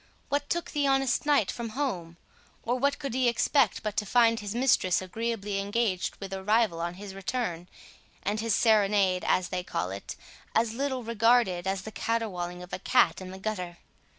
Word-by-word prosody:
What 285 0 -1
took 345 0 -2
the 290 -2 +1
honest 270 0 +1
knight 285 -9 +3
from 235 -1 -5
home? 175 - -2 0.5
or 235 - 0
what 280 +3 +1
could 275 -5 -5
he 255 -1 +3
expect 240 -1 +2
but 210 -2 -3
to 210 - +1
find 230 -1 +4
his 205 +1 -5
mistress 240 -8 +3
agreeably 205 +1 -3
engaged 200 -2 -1
with 195 -1 -7
a 190 0 -5
rival 210 -5 +2
on 170 +1 -3
his 195 +1 -8
return, 195 -3 -3 0.6
and 210 +2 -1
his 225 -1 +1
serenade, 200 -5 +3
as 185 -1 +2
they 180 -1 -2
call 90 - -3
it, 100 +1 -6 0.4
as 225 0 +2
little 260 0 -2
regarded 225 -5 +2
as 190 0 -1
the 220 - -7
caterwauling 180 -7 -2
of 180 - -13
a - - -2
cat 245 0 +3
in 185 - -7
the 190 - -8
gutter? 185 -4 -4
215 Hz, 185 wpm, -28 LUFS, 185-240 Hz, 0.6 s, find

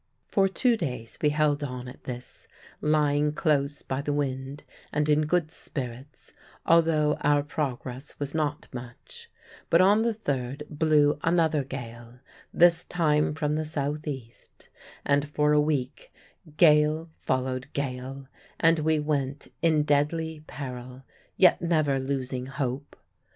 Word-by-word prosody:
For 195 -1 +3
two 230 +5 +2
days 125 - -5
we 150 - +4
held 150 -1 +1
on 125 -2 -5
at 125 - -12
this, 125 -1 -8 0.3
lying 150 -1 +2
close 145 -2 0
by 130 +1 -3
the 145 - -2
wind, 135 -1 -3 0.3
and 150 0 0
in 150 0 +3
good 170 -1 +1
spirits, 130 0 -8 0.3
although 160 -2 +3
our 145 0 +3
progress 135 -2 -5
was 145 -1 -3
not 150 -2 -2
much; 120 -1 -10 0.4
but 165 - +5
on 200 +4 +5
the 230 -1 0
third 140 - -3
blew 150 -1 +3
another 165 -3 +2
gale 120 -2 -8 0.3
this 170 0 +5
time 150 -3 +1
from 150 -2 -1
the 155 +1 0
south 150 0 -3
east 130 -5 -8 0.4
and 145 +1 +2
for 150 0 +2
a 150 - +5
week 150 - -2 0.5
gale 155 0 +4
followed 130 0 -1
gale, 135 0 -4 0.3
and 165 -1 +4
we 155 +1 +2
went 145 -2 -2
in 155 -3 +3
deadly 150 +2 0
peril, 125 -1 -7 0.3
yet 185 - +5
never 155 -5 +1
losing 130 -1 -3
hope. 135 0 -4
145 Hz, 135 wpm, -27 LUFS, 135-155 Hz, 0.5 s, but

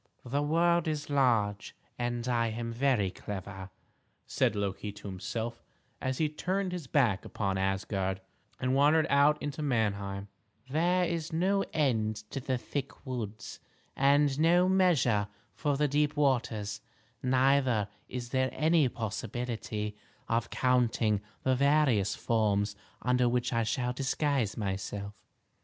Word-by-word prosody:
"The 140 +4 0
world 170 +3 +2
is 150 -2 -3
large, 115 -7 +1 0.2
and 120 0 -2
I 120 -2 +2
am 115 +1 -4
very 120 -6 +2
clever," 95 -1 -7 0.6
said - - +1
Loki 100 0 -2
to 105 - -10
himself, 115 +5 -4 0.4
as 130 0 -1
he 155 - +2
turned 185 +5 -2
his 175 -6 -5
back 120 -9 +2
upon 95 -2 -2
Asgard, 95 0 -1 0.4
and 130 0 0
wandered 150 +3 +4
out 145 +2 +5
into 145 +1 -4
Manheim; 100 -7 -1 0.4
"there 175 +6 +2
is 165 -1 -3
no 190 +4 +2
end 115 -8 +1 0.2
to - - -3
the 130 0 -1
thick 140 +3 -5
woods, 115 -5 -5 0.4
and 140 0 +3
no 175 +3 +5
measure 160 - +3 0.3
for 145 -2 -1
the 150 +1 +2
deep 150 +1 +1
waters; 110 -7 0 0.4
neither 130 -4 +3 0.2
is 125 -1 -5
there 130 0 +1
any 155 -3 +3
possibility 110 -1 -4 0.3
of 115 0 0
counting 120 -4 +2 0.2
the 130 - +3
various 130 -7 +3
forms 105 -3 +1 0.3
under 125 -1 +3
which 125 +1 0
I 115 - +2
shall 125 +3 -1
disguise 135 -3 0
myself. 100 0 -3
125 Hz, 130 wpm, -30 LUFS, 105-145 Hz, 0.6 s, out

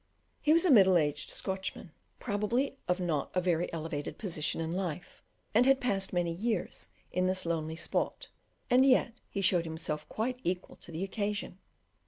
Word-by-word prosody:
He 300 - +3
was 335 +3 +5
a 350 - +5
middle 190 -7 +7
aged 150 -3 0
Scotchman, 190 -2 -4 0.3
probably 235 +5 0
of 180 +1 +1
not 165 -6 -1
a - - +4
very 175 -1 0
elevated 155 -3 -4
position 165 -8 -2
in 165 0 -2
life, 180 -3 -4 0.3
and 240 +4 +5
had 270 0 +5
passed 200 -7 0
many 175 -2 0
years 205 +2 -2 0.2
in 185 +1 +1
this 185 -1 +1
lonely 160 -1 -2
spot, 335 - -2 0.4
and 255 +1 +5
yet 255 -3 +4 0.2
he 200 - -3
showed 180 -3 +3
himself 160 -2 -4
quite 250 +3 -2
equal 180 +1 -3
to - - -11
the 165 +3 -3
occasion. 205 -1 -3
185 Hz, 170 wpm, -31 LUFS, 165-215 Hz, 0.4 s, middle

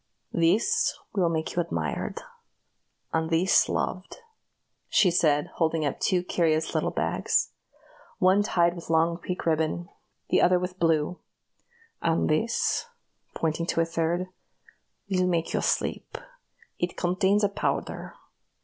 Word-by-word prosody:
This 210 - +2 0.2
will 185 -5 +2
make 160 -1 -2
you 175 - +2
admired, 170 - -3 0.9
and 160 0 0
this 170 +3 +3
loved," 185 0 -3 0.7
she 185 -4 +4
said, 150 -4 +2
holding 160 -2 +1
up 140 - -2
two 180 -1 +1
curious 160 -3 0
little - - +1
bags - - 0 0.7
one 185 +2 +4
tied 175 -4 +2
with 170 - -10
long 165 +1 +2
pink 180 +1 -5
ribbon, 160 +1 0 0.4
the - - +3
other 180 0 +5
with 180 +1 -4
blue 165 +1 +1 0.8
"and 165 0 +1
this," 230 - 0 0.5
pointing 165 +1 -1
to 165 - +1
a - - +2
third, 165 +2 -1 0.8
"will 185 -2 +1
make 170 -2 0
you - - +1
sleep. - - -1 0.6
It 175 0 -2
contains 190 +3 +2
a - - +5
powder. 200 - -3
170 Hz, 130 wpm, -26 LUFS, 165-185 Hz, 0.9 s, other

